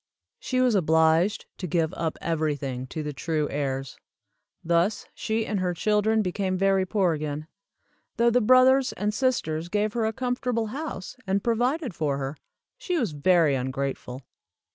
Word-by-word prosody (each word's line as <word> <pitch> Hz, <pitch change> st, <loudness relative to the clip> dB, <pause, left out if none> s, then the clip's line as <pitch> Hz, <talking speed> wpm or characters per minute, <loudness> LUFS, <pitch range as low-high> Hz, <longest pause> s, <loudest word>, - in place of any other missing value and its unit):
She 255 Hz, -, -1 dB
was 250 Hz, -2 st, +3 dB
obliged 160 Hz, +2 st, +3 dB
to 185 Hz, -, -3 dB
give 165 Hz, +1 st, 0 dB
up 165 Hz, -3 st, -3 dB
everything 145 Hz, -6 st, -2 dB
to 155 Hz, +4 st, -5 dB
the 150 Hz, 0 st, -4 dB
true 155 Hz, +1 st, -1 dB
heirs. 135 Hz, -2 st, -3 dB, 0.6 s
Thus 170 Hz, +5 st, +1 dB
she 220 Hz, 0 st, -2 dB
and 210 Hz, -, -1 dB
her 180 Hz, -1 st, -1 dB
children 215 Hz, +3 st, +2 dB
became 185 Hz, 0 st, -1 dB
very 195 Hz, 0 st, +2 dB
poor 185 Hz, -4 st, +2 dB
again. 150 Hz, 0 st, -4 dB, 0.7 s
Though 235 Hz, 0 st, +4 dB
the 250 Hz, +1 st, +3 dB
brothers 255 Hz, +3 st, +5 dB
and 210 Hz, +1 st, -2 dB
sisters 175 Hz, -11 st, -1 dB
gave 210 Hz, +2 st, 0 dB
her 230 Hz, -2 st, 0 dB
a -, -, 0 dB
comfortable 245 Hz, -1 st, -1 dB
house, 285 Hz, -10 st, -5 dB
and 195 Hz, +1 st, 0 dB
provided 245 Hz, -, 0 dB
for 150 Hz, -4 st, -1 dB
her, 135 Hz, +1 st, -4 dB, 0.4 s
she 360 Hz, -2 st, -1 dB
was 230 Hz, -, 0 dB
very 160 Hz, 0 st, +3 dB
ungrateful. 130 Hz, 0 st, -3 dB
185 Hz, 155 wpm, -26 LUFS, 155-220 Hz, 0.7 s, brothers